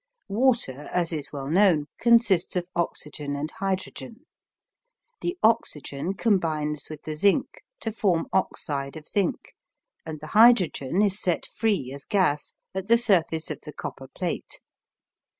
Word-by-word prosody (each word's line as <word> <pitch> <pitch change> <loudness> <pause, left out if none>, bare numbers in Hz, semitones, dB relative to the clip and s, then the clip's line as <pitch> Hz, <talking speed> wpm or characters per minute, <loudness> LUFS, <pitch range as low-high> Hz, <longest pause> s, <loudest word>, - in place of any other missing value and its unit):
Water, 210 - +1
as 175 -1 +1
is 150 -3 -4
well 140 -2 -5
known, 170 -2 +4
consists 230 -8 +4
of 180 -1 0
oxygen 150 -4 -3
and 150 +2 -4
hydrogen. 195 +7 -4 1.0
The 350 +1 -2
oxygen 185 - 0
combines 155 -9 0
with 155 -1 -9
the 155 - -4
zinc 200 +5 +1 0.2
to 225 - -1
form 190 -6 +1
oxide 145 -6 -1
of 155 - -11
zinc, 200 -4 -1 0.5
and 155 -1 -7
the 155 - -9
hydrogen 205 - +5
is 200 0 +1
set 175 -3 0
free 200 - -1
as 140 0 -8
gas 180 -8 +1 0.2
at 190 0 -4
the 235 +1 +6
surface 175 -8 +1
of - - -6
the 150 - -10
copper 135 - -7
plate. 175 +5 -4
175 Hz, 140 wpm, -26 LUFS, 150-205 Hz, 1.0 s, the